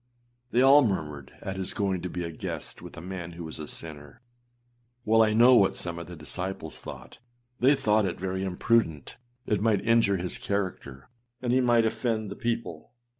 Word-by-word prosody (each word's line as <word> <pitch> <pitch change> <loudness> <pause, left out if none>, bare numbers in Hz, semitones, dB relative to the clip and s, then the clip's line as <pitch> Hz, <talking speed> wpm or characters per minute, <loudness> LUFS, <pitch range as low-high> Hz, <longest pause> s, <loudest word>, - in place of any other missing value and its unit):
â - - -42
They 120 - +4
all 140 +2 +8
murmured 75 - -3
at 95 0 -5
his 95 -1 -3
going 95 -3 0
to 90 - -4
be 90 - -4
âa 85 - -4
guest - - -6
with - - -11
a - - -7
man 90 -1 -6
who 85 0 -8
was 80 -1 -7
a 75 - -6
sinner.â 75 -3 -7 0.9
Well, 115 +1 +5
I 110 -1 +4
know 120 +3 +7
what 100 -6 +5
some 85 -1 -3
of 85 - -8
his 90 -1 -9
disciples 80 0 -5
thought: 65 0 -10 0.4
they 135 +4 +5
thought 110 -6 +2
it 90 - -3
very 95 +1 -2
imprudent; 95 - 0 0.3
it 105 -2 0
might 105 -3 +2
injure 115 -4 +4
his 90 0 -2
character, 90 -9 -4 0.3
and 125 -1 -1
he 130 - +4
might 120 -2 +4
offend 110 -2 -1
the - - -5
people. 115 -7 -4
95 Hz, 195 wpm, -27 LUFS, 85-115 Hz, 0.9 s, all